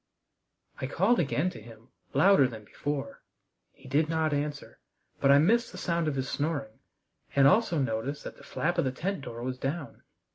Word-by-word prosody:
I 130 - -1
called 195 - +2
again 165 +2 +1
to 110 - -10
him, 115 0 -15 0.3
louder 145 -2 +6
than 110 -3 -9
before. 145 +5 -4 0.5
He - - -17
did 150 +4 +1
not 160 -2 +1
answer, 145 0 -4 0.4
but 135 - +3
I 140 - +8
missed 225 +11 +3
the - - -10
sound 170 -2 -1
of 150 - 0
his 130 0 -2
snoring, 140 -7 -3 0.6
and 140 -1 +6
also 185 +1 +3
noticed 130 +2 -2
that - - -8
the - - -15
flap 175 +3 -1
of - - +2
the 130 - 0
tent 180 +6 -3
door 120 -3 -7
was 130 0 -4
down. 140 -1 -4
145 Hz, 185 wpm, -29 LUFS, 130-165 Hz, 0.6 s, I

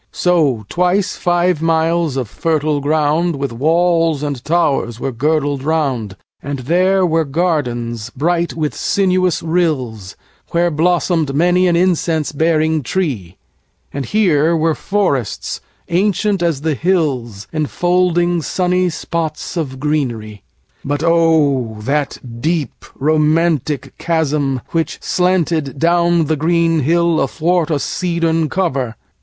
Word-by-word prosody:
So 150 - +1
twice 180 - 0
five 175 -2 +1
miles 165 -2 +1
of 130 -4 -2
fertile 155 +2 -1
groundWith 150 0 0
walls 165 +3 +1
and 140 -4 -4
towers 145 -8 0
were 135 - -2
girdled 145 +2 0
round:And 135 - -3
there 180 +8 +2
were 165 -1 +1
gardens 125 -8 -2
bright 170 +4 0
with 155 -2 -2
sinuous 185 -2 +1
rills, 135 - -1 0.4
Where 170 0 +2
blossomed 165 -2 +1
many 180 +3 +3
an 175 - +2
incense 170 -3 +1
bearing 160 0 +1
treeAnd 125 - -3 0.7
here 170 -6 +2
were 160 0 +2
forests 165 - -2 0.3
ancient 200 +2 +1
as 165 -5 0
the 160 0 0
hills, 135 - -1
Enfolding 175 +2 +1
sunny 180 +2 0
spots 165 -1 -4
of 135 -6 -3
greenery. 120 -8 -2 0.4
But 145 +2 -2
oh! 155 -9 +2
that 140 +5 -1 0.2
deep 160 -2 -2
romantic 155 0 +1
chasm 150 -5 0
which 165 -1 -2
slantedDown 170 -1 +1
the 155 +1 0
green 165 +1 +2
hill 170 +3 +2
athwart 165 +5 0
a 155 - +1
cedarn 165 0 -1
cover! 135 -11 -1
160 Hz, 110 wpm, -17 LUFS, 140-175 Hz, 0.7 s, many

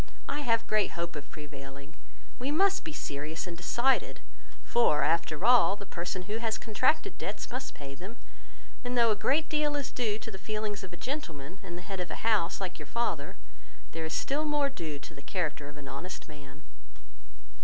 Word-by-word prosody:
I 290 - -1
have 230 -5 +3
great 215 -2 +2
hope 170 0 -2
of 145 -1 -6
prevailing. 140 -1 -9 0.4
We 255 +3 0
must 390 +6 +4
be 320 - -4
serious 150 - -3
and 175 -2 -5
decided; 240 +10 +2 0.4
for 230 -11 +4
after 165 +2 +2
all, 240 -4 +7
the 200 - -8
person 180 +1 -3
who 210 +4 -2
has 225 -1 0
contracted 255 - +2
debts - - -3
must 260 +2 -4
pay 140 -1 -7
them; 190 - -8 0.7
and 245 0 -1
though 230 -2 +6
a - - +4
great 290 +9 +3
deal 300 -1 +2
is 285 -2 -1
due 220 -4 +1
to - - -7
the 190 - -7
feelings 210 -2 -2
of 190 - -6
the 175 - -9
gentleman, 180 - -4
and 175 -3 -6
the 175 - -7
head 195 -2 -4
of 180 -1 -2
a - - -5
house, 210 -7 +3
like 185 -3 -3
your 150 - -7
father, 160 -8 -1 0.6
there 165 - -3
is 160 - -2
still 290 +3 +1
more 295 -2 +3
due 160 - -4
to 140 +3 -10
the 140 - -10
character 150 -2 -2
of 145 - -11
an 145 -2 -8
honest 140 +7 -6
man." 145 -1 -12
190 Hz, 195 wpm, -31 LUFS, 155-240 Hz, 0.7 s, all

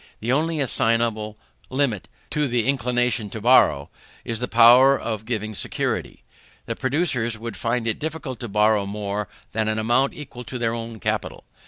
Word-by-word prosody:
The 115 +3 -2
only 155 +3 +1
assignable 115 -4 +1 0.3
limit 130 -7 -1 0.2
to 150 -1 0
the 120 -3 0
inclination 125 -4 0
to 110 - -6
borrow, 105 - +4 0.3
is 115 -1 -2
the 125 - -2
power 125 +4 +6
of 110 -2 -4
giving 110 -2 -3
security: - - -3 0.4
the - - -4
producers 130 -5 0
would 115 -1 -6
find 115 +3 -1
it 110 - -1
difficult 150 -5 -5
to 120 - -5
borrow 105 -1 +2
more 100 0 -3 0.2
than 110 -1 -1
an 110 0 0
amount 120 +5 +1
equal 125 -4 -9
to 125 - -5
their 115 -1 -1
own 115 -1 -6
capital. - - -3
115 Hz, 165 wpm, -23 LUFS, 110-130 Hz, 0.4 s, power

